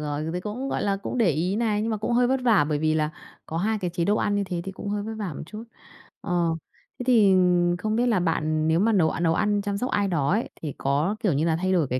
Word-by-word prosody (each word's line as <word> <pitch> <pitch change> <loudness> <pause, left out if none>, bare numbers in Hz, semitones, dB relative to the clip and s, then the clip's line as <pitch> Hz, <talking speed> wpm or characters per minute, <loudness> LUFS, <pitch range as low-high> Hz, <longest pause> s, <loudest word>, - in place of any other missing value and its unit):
rồi. 150 0 -3
Dù 160 - -3
thì 180 - -3
cũng, 225 +8 -4
gọi - - -2
là, 200 -1 +1
cũng 200 +5 -5
để 215 -7 +4
ý 175 +7 -1
này, 215 -2 0
nhưng 225 - -1
mà 220 - 0
cũng 215 +3 -2
hơi 245 +1 +4
vất 265 +1 +1
vả 215 -10 +4
bởi 150 - 0
vì 155 +1 +1
là 155 -1 0 0.4
có 160 - -5
hai 215 +5 0
cái 180 -3 -3
chế 170 0 -1
độ 205 +4 +2
ăn 205 - 0
như 200 0 0
thế 180 -2 -4
thì 195 - -5
cũng 200 - -7
hơi 205 0 -2
vất 220 +2 -5
vả 185 -8 -4
một - - -7
chút. 215 +4 -8 0.6
Ờ, 170 -2 0 0.4
thế - - -3
thì 215 -6 +5 0.4
không 215 +4 -2
biết 240 - +2
là 215 -6 +2
bạn 155 -2 0
nếu 160 +1 +3
mà 220 +4 +3
nấu 165 -5 +3
a - - -4
nấu 165 -1 +2
ăn 205 +2 +1
chăm 200 0 -2
sóc 250 +5 -2
ai 200 -1 +1
đó 150 -6 0
ấy, 220 +4 0
thì 150 -4 -4
có, 145 +9 0
kiểu 200 - +1
như 150 +4 +1
là, 160 - +2
thay 185 +3 0
đổi 165 -6 +2
cái 125 0 -1
190 Hz, 300 wpm, -25 LUFS, 160-215 Hz, 0.6 s, thì